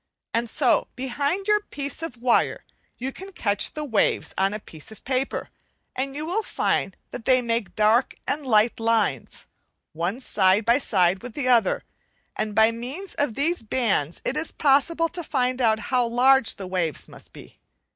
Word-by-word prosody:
And 230 Hz, 0 st, 0 dB
so 255 Hz, +2 st, +2 dB
behind 280 Hz, -, -2 dB
your 420 Hz, 0 st, +4 dB
piece 285 Hz, -8 st, -5 dB
of 325 Hz, -7 st, -6 dB
wire 240 Hz, 0 st, +1 dB, 0.3 s
you 260 Hz, +2 st, -4 dB
can 385 Hz, +7 st, -10 dB
catch 205 Hz, -, 0 dB
the 305 Hz, -, -4 dB
waves 230 Hz, -8 st, 0 dB
on 195 Hz, +1 st, +1 dB
a 210 Hz, -, -4 dB
piece 160 Hz, -1 st, -12 dB
of 220 Hz, -, -14 dB
paper, 260 Hz, +1 st, -2 dB, 0.4 s
and 270 Hz, +1 st, -3 dB
you 300 Hz, +1 st, -4 dB
will 370 Hz, +7 st, 0 dB
find -, -, -1 dB
they 255 Hz, +2 st, +2 dB
make 230 Hz, -3 st, -2 dB
dark 220 Hz, +4 st, +3 dB
and 295 Hz, -, -1 dB
light 230 Hz, -3 st, +3 dB
lines 225 Hz, -, 0 dB, 0.5 s
one 175 Hz, +9 st, -2 dB
side 200 Hz, -4 st, +2 dB
by 235 Hz, +3 st, +4 dB
side 190 Hz, -7 st, +2 dB
with 245 Hz, -2 st, -9 dB
the 275 Hz, -4 st, -2 dB
other, 240 Hz, -3 st, +3 dB, 0.5 s
and 215 Hz, -1 st, -3 dB
by 220 Hz, +1 st, +5 dB
means 265 Hz, +12 st, -6 dB
of 285 Hz, -6 st, -1 dB
these 330 Hz, +5 st, 0 dB
bands 210 Hz, -, -1 dB
it 270 Hz, -, 0 dB
is 310 Hz, +2 st, -2 dB
possible 310 Hz, +4 st, +2 dB
to 355 Hz, -, -4 dB
find 255 Hz, -4 st, -1 dB
out 220 Hz, -2 st, +3 dB, 0.2 s
how 250 Hz, -2 st, +3 dB
large 255 Hz, +1 st, +4 dB
the 195 Hz, -, -7 dB
waves 180 Hz, -5 st, -2 dB
must -, -, -14 dB
be. -, -, -14 dB
245 Hz, 175 wpm, -24 LUFS, 215-280 Hz, 0.5 s, by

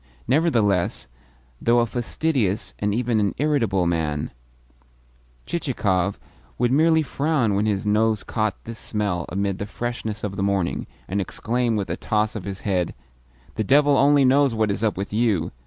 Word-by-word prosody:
Nevertheless, 115 Hz, -, +2 dB, 0.6 s
though 120 Hz, +1 st, +3 dB
a 120 Hz, -, +4 dB
fastidious, 120 Hz, -, -1 dB
and 105 Hz, 0 st, 0 dB
even 115 Hz, +1 st, +1 dB
an 100 Hz, -1 st, 0 dB
irritable, 120 Hz, -11 st, +1 dB
man, 80 Hz, -3 st, -1 dB, 1.1 s
Chichikov 100 Hz, -, -1 dB, 0.4 s
would 120 Hz, 0 st, +1 dB
merely 160 Hz, +3 st, +4 dB
frown 140 Hz, -6 st, 0 dB
when 100 Hz, +2 st, +1 dB
his 100 Hz, -2 st, -1 dB
nose 110 Hz, 0 st, +2 dB
caught 110 Hz, -3 st, -2 dB
this 115 Hz, -1 st, -8 dB
smell 100 Hz, -5 st, -2 dB
amid 100 Hz, 0 st, -2 dB
the 100 Hz, -, -4 dB
freshness 115 Hz, -2 st, -4 dB
of 100 Hz, -2 st, -4 dB
the -, -, -1 dB
morning, 100 Hz, -3 st, 0 dB, 0.2 s
and 100 Hz, +2 st, -1 dB
exclaim 120 Hz, +4 st, -1 dB
with 100 Hz, -5 st, -2 dB
a 85 Hz, -, -2 dB
toss 110 Hz, 0 st, 0 dB
of 105 Hz, -, -5 dB
his 100 Hz, -1 st, -5 dB
head: 90 Hz, -4 st, -1 dB, 0.6 s
"The 110 Hz, -, +1 dB
devil 145 Hz, +5 st, +4 dB
only 140 Hz, 0 st, +5 dB
knows 135 Hz, -1 st, +4 dB
what 110 Hz, -2 st, +1 dB
is 100 Hz, +2 st, -3 dB
up 110 Hz, -4 st, +1 dB
with 100 Hz, +1 st, -4 dB
you! 105 Hz, -7 st, +1 dB
110 Hz, 160 wpm, -23 LUFS, 100-125 Hz, 1.1 s, only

